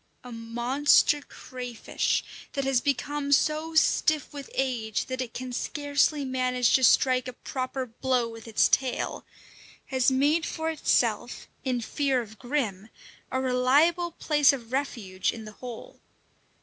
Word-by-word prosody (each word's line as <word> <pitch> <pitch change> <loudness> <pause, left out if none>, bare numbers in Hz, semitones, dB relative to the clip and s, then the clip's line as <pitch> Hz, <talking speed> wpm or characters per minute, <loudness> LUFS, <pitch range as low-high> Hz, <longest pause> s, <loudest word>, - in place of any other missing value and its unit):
A 250 - -10
monster 240 +6 +2
crayfish, 250 -4 -3 0.3
that 275 - -1
has 265 -2 +2
become 285 +1 -2
so 310 +3 +2
stiff 310 -2 +2
with 280 -2 -8
age 235 -5 -1
that 255 0 -4
it 240 -3 -6
can 255 0 -5
scarcely 285 +2 0
manage 255 -1 +1
to 260 - +4
strike 255 0 +4
a 255 - -6
proper 255 +1 -4
blow 245 0 -1
with 225 0 -10
its 220 - +3
tail, 260 -2 -1 0.6
has 260 -1 +3
made 290 +5 +2
for 320 -1 -2
itself, 315 - 0 0.2
in 255 -3 -1
fear 270 +2 0
of 220 -3 -8
Grim, 230 -7 -2 0.4
a 260 - 0
reliable 275 +7 +3
place 295 -4 +4
of 245 -3 -7
refuge 220 -9 -1
in 225 -2 -9
the 215 - -9
hole. 250 - -9
260 Hz, 140 wpm, -27 LUFS, 245-285 Hz, 0.6 s, to